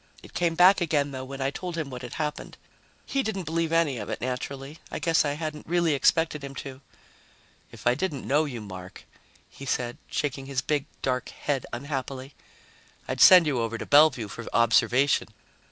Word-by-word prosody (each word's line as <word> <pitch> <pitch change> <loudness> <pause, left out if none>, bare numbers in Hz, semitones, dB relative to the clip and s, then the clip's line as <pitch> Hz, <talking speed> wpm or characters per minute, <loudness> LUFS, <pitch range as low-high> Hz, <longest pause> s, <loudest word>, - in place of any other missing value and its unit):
It - - -14
came 170 -2 0
back 185 +3 +6
again, 145 -4 +1
though, 130 -1 -5
when 135 +1 -7
I 135 +1 0
told 175 +3 -5
him 150 -4 -3
what 125 -1 -7
had 125 -2 -7
happened. 150 -1 -4 0.5
He 275 - 0
didn't 205 -6 -3
believe 165 0 -1
any 165 -7 +2
of - - -6
it, - - -3
naturally. 135 +4 -5
I - - -4
guess 165 -1 +2
I 145 -1 -1
hadn't 155 0 -5
really 170 -1 +2
expected 150 +1 +2
him 140 0 -7
to. 135 -1 -8 0.9
"If - - -13
I 120 - +5
didn't 145 -1 -3
know 150 +3 +3
you, 125 -6 -6
Mark," 95 -3 -9 0.4
he 140 - -11
said, 120 -1 -2
shaking 135 -2 -2
his 135 -1 -2
big, 150 -1 -1 0.2
dark 130 -1 -1
head 140 -4 -3
unhappily, 135 +1 -5 0.7
"I'd - - -2
send 180 -3 +9
you 140 -5 0
over 115 0 -2
to - - -6
Bellevue 145 -6 +5
for 120 +4 -8
observation. 120 +4 +3
140 Hz, 185 wpm, -26 LUFS, 130-160 Hz, 0.9 s, send